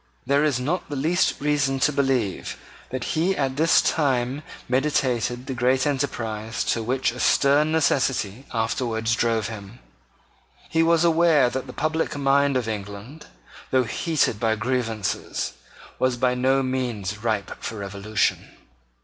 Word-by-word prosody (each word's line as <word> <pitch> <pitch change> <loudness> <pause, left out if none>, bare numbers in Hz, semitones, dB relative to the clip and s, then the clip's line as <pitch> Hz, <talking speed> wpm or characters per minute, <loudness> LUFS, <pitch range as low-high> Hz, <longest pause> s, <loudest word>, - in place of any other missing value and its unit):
There 140 +2 +3
is 145 -5 +1
not 165 +8 -2
the 145 - -4
least 160 +6 +1
reason 140 -2 +1
to 150 - +4
believe 135 -8 -1 0.3
that 130 -1 -4
he 175 +9 0
at 135 -2 -1
this 160 +3 +4
time 135 -2 0 0.3
meditated 125 -2 0
the 130 - -4
great 130 +1 +2
enterprise 115 -6 -2
to 115 - -2
which 125 +3 0
a 125 - -9
stern 145 +4 +3
necessity 135 -6 0
afterwards 115 0 0
drove 115 -3 0
him. 105 0 -9 0.9
He 160 - +1
was 165 0 +3
aware 165 -6 +4
that 130 0 -4
the - - -7
public 155 +1 -1
mind 140 0 +3
of 120 -3 -2
England, 105 +7 -7 0.4
though 130 -1 +3
heated 135 -1 0
by 110 -1 +1
grievances, 110 -3 -2 0.5
was 130 -1 +1
by 125 0 +2
no 130 +2 +2
means 120 -6 -2
ripe 110 -3 -2
for 115 - -4
revolution. 100 +1 -1
130 Hz, 140 wpm, -24 LUFS, 115-140 Hz, 0.9 s, to